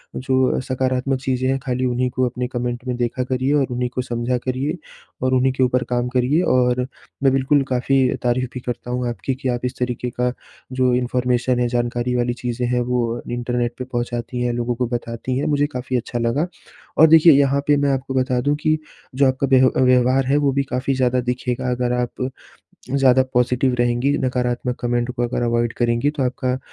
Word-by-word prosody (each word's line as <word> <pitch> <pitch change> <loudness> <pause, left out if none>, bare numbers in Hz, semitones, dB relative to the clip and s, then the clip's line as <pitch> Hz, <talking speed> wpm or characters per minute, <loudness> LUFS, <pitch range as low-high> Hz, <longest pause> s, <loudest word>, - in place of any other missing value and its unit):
जो 130 0 +1
सकारात्मक 130 +1 -1
चीज़ें 130 -1 -1
हैं 135 - +1
खाली 130 0 -1
उन्हीं 125 0 0
को 130 - +1
अपने 125 +1 -3
कमेंट 120 0 -4
में 125 - -1
देखा 120 +1 -1
करिए 130 +2 0
और 140 -3 +2
उन्हीं 125 0 -1
को 125 - 0
समझा 120 0 -2
करिए 135 +6 -1 0.4
और 130 0 +1
उन्हीं 130 0 +3
के 130 - +1
ऊपर 125 0 +2
काम 120 0 0
करिए 135 +7 +2
और 125 0 +2 0.4
मैं 135 - +4
बिल्कुल 135 +2 +3
काफ़ी 130 +2 +1 0.2
तारीफ़ 125 +1 0
भी 125 - -5
करता 125 0 -5
हूँ 125 0 -1
आपकी 120 +4 -3
कि 130 -1 -3
आप 120 -1 -1
इस 125 +1 -4
तरीके 125 0 -2
का 125 0 +1 0.4
जो 130 -1 +2
इन्फॉर्मेशन 125 0 0
है 120 - +2
जानकारी 120 +1 -1
वाली 120 0 0
चीज़ें 125 0 -2
हैं 125 0 +1
वो 120 -2 0
इंटरनेट 120 0 -1
पे 125 - -5
पहुँचाती 120 -1 -3
हैं 120 -1 0
लोगों 120 0 -1
को 125 0 -1
बताती 120 +2 -4
हैं 140 - -1
मुझे 145 -1 +2
काफ़ी 125 0 -2
अच्छा 120 0 -4
लगा। 120 +9 0 0.5
और 160 - +8
देखिए 160 0 +7
यहाँ 140 0 +3
पे 145 - +5
मैं 140 - +2
आपको 135 0 -2
बता 130 -1 +1
दूँ 145 +3 +1
कि 155 0 +2 0.4
जो 140 +1 +4
आपका 130 +1 0
व्यह 130 0 +6 0.2
व्यवहार 130 +1 +3
है 135 +3 +2
वो 145 -2 +2
भी 140 +1 +1
काफ़ी 130 0 -2
ज़्यादा 130 -1 +2
दिखेगा 125 +1 -2
अगर 125 0 -1
आप 125 +1 -2 0.7
ज़्यादा 130 -1 +5
पॉजिटिव 125 +1 +2
रहेंगी 120 +3 +2
नकारात्मक 125 -1 -1
कमेंट 120 0 0
को 120 -1 -3
अगर 120 0 -1
अवॉइड 120 -1 +1
करेंगी 120 +4 +1
तो 135 - 0
आपका 130 0 -1
125 Hz, 200 wpm, -21 LUFS, 120-130 Hz, 0.7 s, और